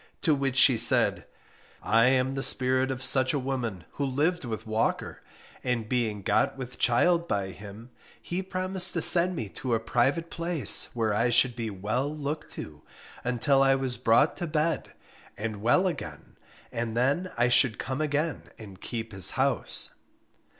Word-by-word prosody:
To 160 - +3
which 135 -2 -1
she 125 -2 +6
said, - - +4 0.6
"I 115 +2 +3
am 130 +1 +2
the 135 - -3
spirit 130 0 +1
of 130 0 -4
such 130 +2 +2
a - - 0
woman, 125 -9 -4
who 145 - -4
lived 145 +6 0
with 110 -2 -6
Walker; 110 0 -2 0.4
and 120 -3 -2
being 110 -5 -2
got - - +1
with 125 -1 -8
child 170 +8 +2
by 100 -2 -2
him, 105 +5 -12 0.3
he 175 +2 -4
promised 185 0 -2
to 165 - -1
send 180 +1 +6
me 115 -9 -4
to 125 +3 -2
a - - 0
private 135 +9 0
place, 170 -4 0
where 110 -3 0
I 115 +4 +1
should 120 +1 +3
be 115 -2 -4
well 110 +8 -3
looked 150 0 -5
to, 75 -1 -9 0.4
until 125 +3 +1
I 135 0 +4
was 130 -3 -3
brought 125 +5 +3
to 175 - -4
bed, 155 0 -2 0.4
and 105 -1 -5
well 120 - +3
again, 175 -6 -6 0.4
and 115 -1 -4
then 145 +9 0
I 120 +1 +2
should 120 -2 +3
come 130 +4 -4
again 150 0 -2
and 100 -3 -12
keep 115 -1 -6
his 95 -3 +2
house." - - 0
130 Hz, 170 wpm, -27 LUFS, 115-150 Hz, 0.6 s, she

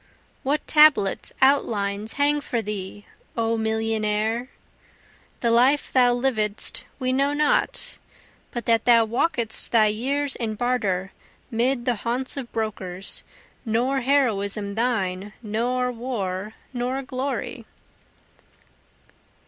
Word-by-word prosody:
What 285 +3 -1
tablets, 300 -10 +4
outlines, 215 -6 +2
hang 290 +1 +2
for 240 - -2
thee, 205 -1 -5 0.3
O 230 0 +1
millionnaire? 220 +1 0 0.9
The 235 - +2
life 255 +5 +3
thou 245 -2 +5
lived'st 220 -5 -1
we 255 -1 0
know 275 +2 +2
not, 300 +11 0 0.5
But 240 -2 -5
that 230 -1 +2
thou 235 -2 +6
walk'dst 235 -1 0
thy 225 -2 +5
years 265 +6 -1
in 220 -2 -3
barter, 205 -6 0 0.4
'mid 240 +2 0
the 245 -3 +1
haunts 245 +5 -3
of 265 -4 -6
brokers, 195 -4 -3 0.4
Nor 250 +4 +1
heroism 215 -7 +1
thine, 205 -4 -1
nor 245 +4 0
war, 215 -5 -4 0.2
nor 255 +2 -2
glory. 260 +2 -4
235 Hz, 110 wpm, -24 LUFS, 215-260 Hz, 0.9 s, thou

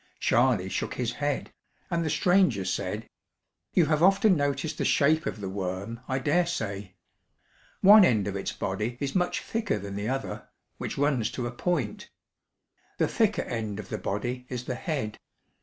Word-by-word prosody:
Charley 120 -7 +3
shook - - -3
his 120 -2 -1
head, 145 +2 -2 0.4
and 170 -1 +1
the 160 - -1
stranger 175 - +3
said: 100 +4 -2 0.7
"You 175 - +5
have 155 0 +1
often 195 +2 +5
noticed 145 0 -1
the - - +1
shape 155 +3 +3
of - - -4
the 95 - -3
worm, 95 +4 -4
I 130 - 0
dare 150 +6 +2
say. 100 - -4 0.9
One 205 +2 +9
end 110 - +3
of 100 - -3
its 95 - -2
body 105 +6 -3
is 140 -1 -2
much 180 -1 0
thicker 225 - -1
than 100 0 -6
the 100 +2 -2
other, 135 +1 -4 0.3
which - - -4
runs 140 -6 +1
to 125 - -3
a 120 - -3
point. 130 - -2 0.9
The - - +2
thicker - - +1
end 110 -3 -4
of 100 - -8
the 110 - -3
body 120 +7 -3
is 125 -1 -4
the 130 - -2
head. 130 -6 -3
125 Hz, 175 wpm, -27 LUFS, 105-155 Hz, 0.9 s, One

